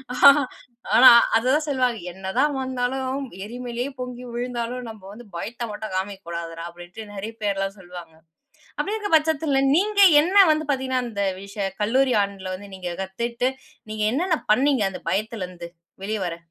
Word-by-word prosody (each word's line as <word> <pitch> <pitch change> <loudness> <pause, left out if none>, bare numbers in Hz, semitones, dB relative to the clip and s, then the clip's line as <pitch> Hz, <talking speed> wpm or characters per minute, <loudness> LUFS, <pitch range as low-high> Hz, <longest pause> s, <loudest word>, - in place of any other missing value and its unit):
ஆ, - - -5 0.8
அ - - +7 0.4
அததான் 265 +6 +1
சொல்வாங்க."என்னதான் 235 0 -1
வந்தாலும், 260 +1 -2 0.2
எரிமலேயே 245 +2 -5
பொங்கி 250 0 -6
விழுந்தாலும் 245 0 -4
நம்ம 220 -2 -11
வந்து 235 +1 -13
பயத்த 230 +6 -5
மட்டும் 210 -2 -6
காமிக்க 195 -1 -4
கூடாதுடா." 165 0 -5
அப்டின்ட்டு 175 +5 -11
நிறைய 210 +3 -6
பேர்லாம் 195 0 -1
சொல்வாங்க. 175 -3 -11 0.7
அப்டி 415 - -1
இருக்க 410 -1 -4
பட்சத்துல 300 -3 +1
நீங்க 405 +3 +1 0.2
என்ன 385 +3 +6
வந்து 310 0 -1
பாத்தீங்கன்னா, 260 -1 -1
அந்த 200 -3 -2 0.2
விஷயம் 195 -1 -5
கல்லூரி 255 +4 +2
ஆண்டுல 195 -2 -6
வந்து 200 +1 -12
நீங்க 180 -1 -5
கத்துட்டு 235 +6 -2 0.4
நீங்க 215 0 -2
என்னென்ன 325 +3 +1
பண்ணீங்க? 260 -1 +2
அந்த - - -8
பயத்துலேருந்து 185 -5 -4 0.4
வெளிய 215 0 -2
வர? 170 -1 -4
230 Hz, 140 wpm, -23 LUFS, 195-260 Hz, 0.8 s, அ